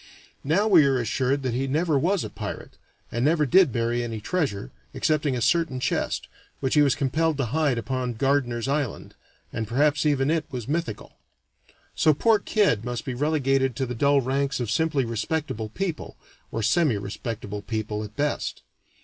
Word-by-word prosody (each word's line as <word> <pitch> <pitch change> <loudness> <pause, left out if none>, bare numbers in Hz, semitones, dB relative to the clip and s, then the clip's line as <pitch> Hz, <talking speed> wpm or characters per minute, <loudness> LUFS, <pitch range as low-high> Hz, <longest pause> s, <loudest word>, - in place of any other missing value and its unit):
Now 180 +10 +2
we 180 -7 +7
are 135 -1 +2
assured 130 +3 0
that 125 -2 -1
he 135 +3 -1
never 155 +3 +1
was 175 +6 +1
a - - -5
pirate, - - -7 0.3
and 120 +2 -1
never 155 +1 +3
did 180 +1 +5
bury 120 +1 0
any 115 -2 -4
treasure, 105 - -2 0.2
excepting 150 -3 +1
a 120 - -2
certain 165 -2 +1
chest, - - -1 0.3
which 130 -1 -1
he 150 - +5
was 140 -2 +3
compelled 155 +3 0
to 140 - 0
hide 150 -5 +2
upon 125 0 -2
Gardiner's 130 -2 0
Island 140 -4 -2 0.4
and 110 -1 -3
perhaps 145 +5 +2
even 145 -1 +2
it 160 -2 0
was 125 -4 -6
mythical. 160 -6 -3 0.8
So 155 -2 +3
poor 220 +6 +3
Kidd 200 - +1
must 120 0 -4
be 130 - -3
relegated 135 -2 +1
to 130 - -1
the 125 - -4
dull 140 +3 +3
ranks 135 +2 -1
of 120 -3 -2
simply 150 -2 +1
respectable 115 -1 -3
people, 170 - -4 0.3
or 115 - -2
semirespectable 110 - -1
people 110 -1 -3
at 105 0 -9
best. 145 0 -2
135 Hz, 170 wpm, -25 LUFS, 120-155 Hz, 0.8 s, we